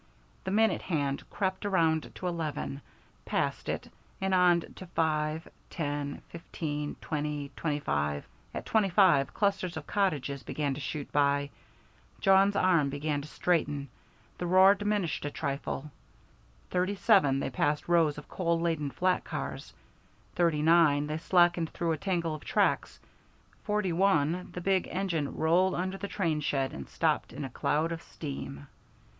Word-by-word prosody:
The - - -2
minute 220 +3 +3
hand 145 -5 -2
crept 190 -2 -2
around 165 -6 +1
to - - -7
eleven, 160 -5 -3 0.4
passed - - -1
it, - - -3 0.3
and 190 0 0
on 180 -2 +5 0.2
to 185 - -9
five, 155 -1 0 0.2
ten, 145 -3 -3
fifteen, 150 -3 -4
twenty, 150 -2 -3
twenty 150 -3 -1
five. 75 - -1 0.3
At - - -6
thirty 215 -3 +3
five 175 -8 +4
clusters 195 -4 0
of 150 - -6
cottages 145 -9 0
began 145 -1 -2
to 135 - -6
shoot 145 +1 -5
by. 140 0 +2 0.7
Jawn's 195 +1 +5
arm 175 -7 +3
began 145 +1 -2
to 145 - -9
straighten 150 -5 0 0.5
the 175 - -2
roar 190 +2 +7
diminished 205 -5 -1
a - - -1
trifle. 140 +1 -4 0.8
Thirty 185 +2 +1
seven 190 - +4
they 135 - -2
passed 145 +4 0
rows 165 -4 +3
of 150 - -9
coal 170 -2 0
laden 165 -4 0
flat 185 +5 +1
cars; - - -5 0.6
thirty 165 -4 +2
nine, 155 -3 +5
they 155 +1 -3
slackened 175 -1 +3
through 170 -1 -1
a 160 - 0
tangle 170 -2 -1
of 155 - -7
tracks; - - +1 0.7
forty 210 -4 0
one, 175 -2 +2
the 180 - -5
big 190 +1 +1
engine 175 -6 -2
rolled 175 +4 +3
under 185 +2 -2
the 200 - -4
train 165 -7 -1
shed 135 -2 -1
and 70 - -8
stopped - - 0
in 140 +3 -5
a 130 - -7
cloud 155 +6 0
of 165 0 -4
steam. 135 - -7
165 Hz, 150 wpm, -30 LUFS, 145-185 Hz, 0.8 s, roar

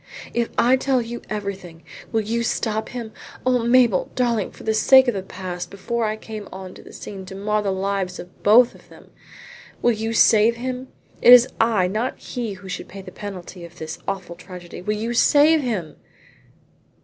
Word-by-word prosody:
"If 235 -1 0
I 255 +2 +4
tell 265 0 +1
you 240 0 -5
everything 195 -5 -6 0.3
will 225 - +1
you 230 +3 -2
stop 220 -1 -1
him? 235 -3 -6 0.3
Oh, 255 -1 +3
Mabel, 235 -4 +3
darling, 235 -5 0
for - - -14
the 220 - 0
sake 265 +4 +6
of 245 - +2
the 195 - -3
past 185 -1 -6
before 230 +4 -2
I 215 0 -1
came 215 -2 -8
on 185 -1 -8
the - - -13
scene 195 -2 -8
to 190 - -8
mar 210 +2 0
the 200 - -1
lives 190 -1 -2
of 180 - -12
both 235 +4 +6
of - - -19
them - - -17 0.7
will 240 - +5
you 225 +1 -3
save 225 +1 +5
him? 255 +2 -5 0.3
It 245 - +7
is 250 0 +9
I 225 -5 +3
not 215 +7 -2
he 235 -5 -5
who 190 0 -12
should 185 0 -6
pay 195 +1 -10
the 185 - -10
penalty 185 -3 -8
of 170 +1 -12
this 160 -1 -7
awful 190 -3 -4
tragedy. 180 -1 -10
Will 210 +3 -2
you 230 +3 -2
save 295 +5 +5
him?" 210 - -3
215 Hz, 190 wpm, -22 LUFS, 190-235 Hz, 0.7 s, is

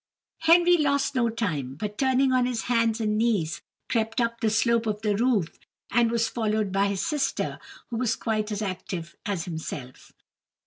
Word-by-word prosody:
Henry 345 +2 +5
lost 280 -2 +1
no 240 -3 +2
time, 155 - -2
but, 210 +6 -5
turning 265 +2 +2
on 250 -1 +3
his 245 -3 -2
hands 230 -2 +1
and 215 -1 0
knees, 180 -8 0 0.3
crept 225 -1 0
up 235 -1 -1
the 220 - +2
slope 230 +1 +2
of 210 0 -2
the 210 -2 +1
roof, 220 -7 +1 0.3
and 235 +1 +3
was 230 -1 +1
followed 215 -3 -1
by 195 +1 +2
his 200 -1 -1
sister, 300 -4 -1 0.3
who 230 - -2
was 230 -2 +1
quite 215 -1 -2
as 210 +1 -2
active 180 -3 -5
as 190 -5 -2
himself. 155 -6 -7
225 Hz, 175 wpm, -26 LUFS, 200-245 Hz, 0.3 s, Henry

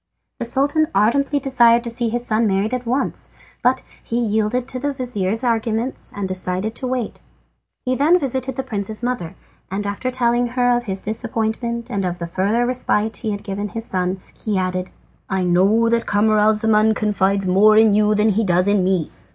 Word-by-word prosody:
The 240 - -2
Sultan 285 +6 +1
ardently 275 +8 +2
desired 240 -3 +4
to 235 - -3
see 235 0 -1
his 240 +2 -2
son 220 0 +1
married 200 +4 0
at 250 -1 -3
once, 255 +4 -2 0.3
but - - +2 0.2
he 230 - -3
yielded 220 +2 0
to 255 - -4
the 285 +2 -1
vizir's 225 -4 -2
arguments 230 +1 -1
and 200 -1 -3
decided 185 +3 -2
to 255 - -4
wait. 250 -3 -3 0.6
He 255 - +1
then 305 +7 +4
visited 265 -4 -2
the 265 - -3
prince's 215 0 -4
mother, 245 -10 -3 0.3
and 200 +2 -3
after 205 +5 -2
telling 245 -1 +1
her 245 0 +2
of 240 0 -2
his 190 -2 -3
disappointment 225 +2 -2
and 200 -1 -1
of 180 -1 -2
the 170 - -4
further 200 +8 0
respite 225 -3 0
he 220 - -4
had 205 -1 -4
given 205 0 -4
his 225 +1 -4
son, 185 -1 -1 0.2
he 210 -3 0
added: 185 0 -2 0.4
"I 190 -1 0
know 195 +6 +3
that 230 0 0
Camaralzaman 215 +1 +3
confides 200 -2 +1
more 205 +4 +5
in 220 -1 +6
you 210 0 +3
than 210 +1 +3
he 215 +2 +1
does 180 -1 +2
in 205 -2 +3
me. 185 -3 0
220 Hz, 185 wpm, -20 LUFS, 200-245 Hz, 0.6 s, in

